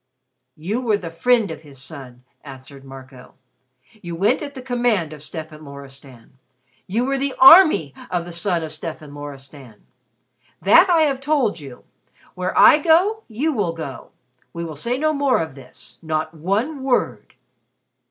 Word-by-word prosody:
"You 200 +11 -3
were 220 -5 +1
the 170 -5 -8
friend 225 +2 +1
of 160 - -8
his 140 -4 -15
son," 130 -3 -11 0.2
answered 135 0 -12
Marco. 130 -1 -13 0.7
"You 170 -1 -6
went 205 +9 +1
at 285 -1 -7
the 260 - -7
command 240 - 0
of 150 - -12
Stefan 155 0 -9
Loristan. 135 -3 -14 0.5
You 230 +6 -1
were 275 0 -1
the 275 0 -2
army 270 - +7 0.2
of 175 -1 -2
the 175 - -9
son 170 0 -2
of 155 - -6
Stefan 155 -1 -8
Loristan. 140 -5 -12 0.7
That 330 - +5
I 330 -2 +4
have 275 -3 -1
told 270 - 0
you. 135 -4 -12 0.5
Where 180 0 -4
I 320 -1 +7
go, 360 +8 +3
you 275 +8 -2
will 200 -9 -1
go. 140 -7 -8 0.4
We 170 - -5
will 160 -2 -7
say 235 - -2
no 310 +2 0
more 280 -3 +1
of 160 -3 -4
this 130 -2 -14
not 160 0 -3
one 205 - -2
word." 260 -2 -2
170 Hz, 160 wpm, -21 LUFS, -, 0.7 s, army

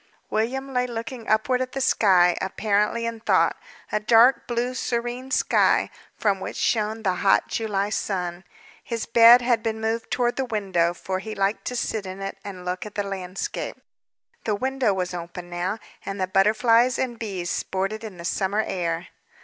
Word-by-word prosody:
William 265 +5 -1
lay 250 0 +1
looking 230 0 -6
upward 250 +4 +2
at 255 0 -3
the 270 - -2
sky, 185 -8 +4
apparently 210 +3 0
in 230 -1 -3
thought, - - +3 0.4
a 215 - +1
dark 230 +4 +5
blue, 240 +1 -1
serene 245 +1 -3
sky, - - +3 0.3
from 200 -3 +1
which - - -6
shone 220 0 0
the 185 -3 +1
hot 195 - +4
July 205 -3 -1
sun. 180 -4 -2 0.4
His 230 -2 -3
bed 235 +1 +7
had 240 -2 +2
been 220 -1 -2
moved 225 +1 -2
toward 240 -1 0
the 265 - 0
window, 190 -7 0
for 185 +1 -3
he 215 +3 -6
liked 195 +2 0
to 250 - -3
sit 220 -4 -2
in 185 +1 -7
it, 195 0 -5
and 185 -3 -8
look 180 0 -3
at 210 - -10
the 205 - 0
landscape. 190 -1 -4 0.7
The 215 - 0
window 260 0 0
was 185 -2 -2
open 175 0 -7
now, 180 +4 -2 0.3
and 195 0 -5
the 185 - +1
butterflies 220 +6 +3
and 240 -3 -2
bees 190 -6 -3
sported 195 +4 -2
in 210 -5 -8
the 170 - -8
summer 200 +3 0
air. 170 -1 -3
215 Hz, 175 wpm, -24 LUFS, 190-235 Hz, 0.7 s, bed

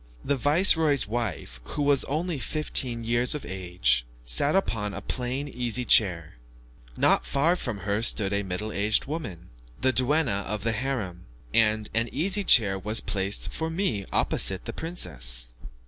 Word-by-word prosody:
The 140 - +1
viceroy's 150 - +3
wife, 105 - -4
who 145 - -4
was 140 -2 +4
only 160 +1 -2
fifteen 125 -5 0
years 120 +4 +1
of 150 - -6
age, 85 -11 +1 0.2
sat - - +2
upon 110 - -1
a 100 - -6
plain 130 +6 -3
easy 125 -2 -3
chair, 85 - +3 0.6
not - - +3
far 155 +6 +1
from 120 - -5
her 100 +2 -1
stood 105 -3 +1
a 100 - 0
middle 100 +3 -4
aged 105 +1 +1
woman, 120 - -6 0.3
the 130 0 +1
duenna 130 -6 +1
of 105 0 -4
the 115 - +1
harem, 110 - -3 0.3
and 110 -1 +2
an 115 +1 0
easy 195 +6 +2
chair 100 - +4
was 105 +4 0
placed 100 0 -1
for 160 0 -2
me 160 - -2
opposite 95 -1 0
the - - -5
princess. - - -2
115 Hz, 155 wpm, -26 LUFS, 100-140 Hz, 0.6 s, was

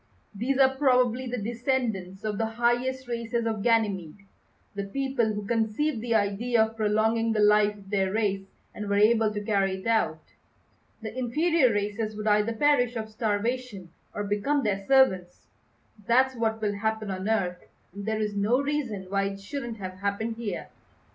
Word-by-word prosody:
These 245 +6 -1
are 265 -1 +4
probably 255 -2 +2
the 250 +1 -3
descendants 225 -4 -2
of 210 -2 -2
the 225 - +1
highest 240 +3 0
races 235 -1 -2
of 220 -2 -1
Ganymede; 200 -5 0 0.5
the 200 -1 -4
people 265 0 -1
who 210 -1 -5
conceived 230 +4 0
the 230 -1 0
idea 220 +3 +2
of 220 0 -4
prolonging 220 +1 +1
the 215 - 0
life 210 0 +4
of 195 -1 -15
their 190 -2 +1
race 200 -2 -1 0.3
and 210 -1 -6
were 200 - +1
able 220 +1 +4
to 210 - -3
carry 195 -2 +1
it 190 - -10
out. 190 -9 +1 0.8
The 220 +1 -6
inferior 265 +3 +2
races 210 +1 -2
would 215 0 -5
either 210 +1 +2
perish 245 -1 +2
of 220 -1 -4
starvation 215 -3 -2 0.2
or 205 - -2
become 210 +8 0
their 200 -2 -1
servants. 190 -10 +3 0.6
That's 260 +2 +3
what 220 -1 -1
will 205 -1 +1
happen 220 -1 -1
on 190 +2 -3
Earth, 180 -5 -1 0.3
and 200 +1 -7
there 220 0 0
is 210 -1 -2
no 210 +6 +2
reason 280 -9 -2
why 195 +1 0
it 195 0 -4
shouldn't 235 +3 -6
have 185 -2 -7
happened 205 +3 -2
here." 230 -3 -5
220 Hz, 170 wpm, -27 LUFS, 205-240 Hz, 0.8 s, are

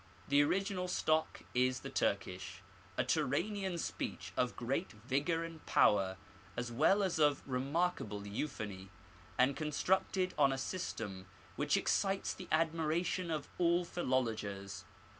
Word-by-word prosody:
The 140 0 +6
original 190 +4 +1
stock 160 -3 +1
is 130 +1 +2
the - - -6
Turkish, 95 0 -1 0.3
a - - +3
Turanian 175 +7 0
speech - - -4
of 125 -1 +1
great 135 +8 -2
vigour 140 +9 0
and 165 -1 -8
power, 95 -2 +4 0.4
as 120 0 -2
well 160 - +4
as 185 -4 0
of 145 -2 +3
remarkable 135 - -1
euphony, 100 -4 -4 0.5
and 130 +2 +4
constructed 185 +5 +1
on 140 -2 +6
a 135 - -1
system 110 - -4 0.3
which - - +2
excites 195 0 +1
the 185 - -9
admiration 165 +2 +1
of 155 -3 -2
all 175 0 +3
philologers. 105 - -2
145 Hz, 125 wpm, -35 LUFS, 115-170 Hz, 0.5 s, The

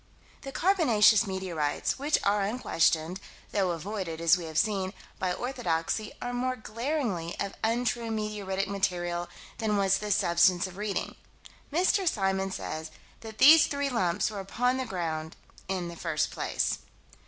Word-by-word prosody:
The 270 - -7
carbonaceous 230 - +4
meteorites, 180 - -2
which 295 +2 +2
are 205 +1 +2
unquestioned 180 -5 +1 0.3
though 195 -3 +1
avoided, 175 -1 -4
as 165 +1 +5
we 175 -2 -5
have 160 -1 -5
seen 190 +1 +1 0.3
by 185 -1 0
orthodoxy, 215 -4 -2
are 245 0 -4
more 255 +1 -1
glaringly 230 - -3
of 200 -1 -2
untrue 235 0 0
meteoritic 210 -3 -2
material 175 -3 -1 0.3
than 215 -2 +1
was 195 -1 +3
this 210 -2 0
substance 175 +1 +3
of 185 -1 -8
Reading. 205 -1 -3 0.5
Mr. 365 +3 +3
Symons 195 -3 -1
says 160 0 -5 0.3
that 220 -1 -10
these 315 +3 +8
three 280 -1 -1
lumps 185 -4 +1
were 205 - -5
upon 245 +6 0
the 260 -1 -3
ground 160 -3 -3 0.3
"in 185 -2 -2
the 170 - -7
first 160 -2 -1
place." - - -1
195 Hz, 145 wpm, -28 LUFS, 175-235 Hz, 0.5 s, these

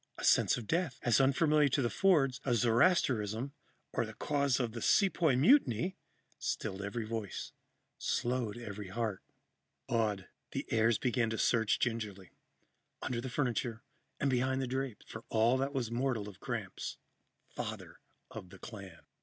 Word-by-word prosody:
A - - -7
sense - - +4
of 120 - -6
death, 160 - 0
as 120 +2 +4
unfamiliar 150 +2 +4
to 135 - +1
the - - +2
Fords 140 -9 +3
as 120 -4 +1
Zoroastrianism 120 - +2 0.4
or - - +1
the - - -8
causes 140 -3 +1
of 120 -3 -1
the 115 0 -6
Sepoy 175 -8 +3
Mutiny, 175 - +4 0.4
stilled 95 +1 -3
every 110 +3 -3
voice, 110 -3 -4 0.5
slowed 120 -3 -1
every 105 -4 -7
heart. 105 0 -2 0.7
Awed, 105 -5 0 0.3
the - - -2
heirs 115 0 +3
began 120 -2 +1
to 110 - -2
search 115 -2 +2
gingerly, 105 -6 -3 0.7
under 120 -2 -2
the 130 - -5
furniture 120 -3 -1 0.4
and 140 - +1
behind 130 +1 +1
the 135 - 0
drapes, 130 -2 -3
for 110 - -8
all 115 +3 +3
that 135 +1 0
was 125 -5 -2
mortal 120 -4 -1
of 100 -3 -11
Gramps, - - -4 0.6
father - - -6 0.3
of 90 - -8
the - - -12
clan. 100 -7 -10
120 Hz, 155 wpm, -33 LUFS, 110-135 Hz, 0.7 s, sense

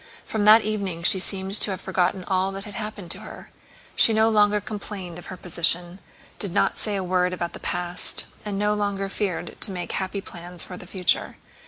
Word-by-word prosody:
From 215 -2 -1
that 215 +2 +8
evening 200 -5 -2
she 190 - +5
seemed 190 0 -1
to - - +5
have 190 - -3
forgotten 185 +1 0
all 190 +1 +1
that 195 0 -6
had 210 - -9
happened 210 -5 -6
to 195 - -1
her. 215 - -11 0.4
She 225 - +5
no 220 +1 +4
longer 210 -1 +4
complained 200 -5 -6
of - - -12
her 185 - -7
position, 175 +1 +1 0.4
did 200 - -2
not 195 - +1
say 210 -2 0
a 195 - -1
word 180 0 +1
about 170 -1 -3
the - - -8
past, 175 0 -2 0.2
and 205 -2 -3
no 210 +1 +2
longer 200 -1 -1
feared 195 -3 -3
to 205 - +5
make 180 -2 -4
happy 190 +1 -2
plans 175 -2 -4
for 180 - -8
the 180 - -10
future. 180 -2 0
195 Hz, 205 wpm, -25 LUFS, 180-205 Hz, 0.4 s, that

